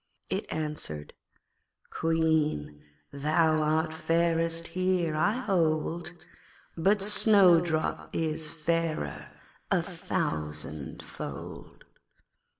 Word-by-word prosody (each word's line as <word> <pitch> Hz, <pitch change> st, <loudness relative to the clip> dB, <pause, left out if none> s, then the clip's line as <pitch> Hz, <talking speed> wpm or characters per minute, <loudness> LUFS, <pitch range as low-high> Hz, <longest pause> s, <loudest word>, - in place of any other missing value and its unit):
it -, -, -2 dB
answered 150 Hz, -, -4 dB, 0.8 s
'Queen, 160 Hz, -, 0 dB, 0.3 s
thou 155 Hz, +2 st, +2 dB
art 155 Hz, +1 st, +1 dB
fairest 165 Hz, 0 st, +1 dB
here, 185 Hz, -3 st, 0 dB
I 175 Hz, +7 st, +2 dB
hold, 170 Hz, -3 st, 0 dB, 0.5 s
But 195 Hz, +4 st, +2 dB
Snowdrop 180 Hz, -6 st, +4 dB
is 160 Hz, -1 st, -1 dB
fairer 160 Hz, -, -2 dB, 0.4 s
a -, -, +2 dB
thousandfold.' 75 Hz, -1 st, -5 dB
160 Hz, 70 wpm, -29 LUFS, 155-170 Hz, 0.8 s, Snowdrop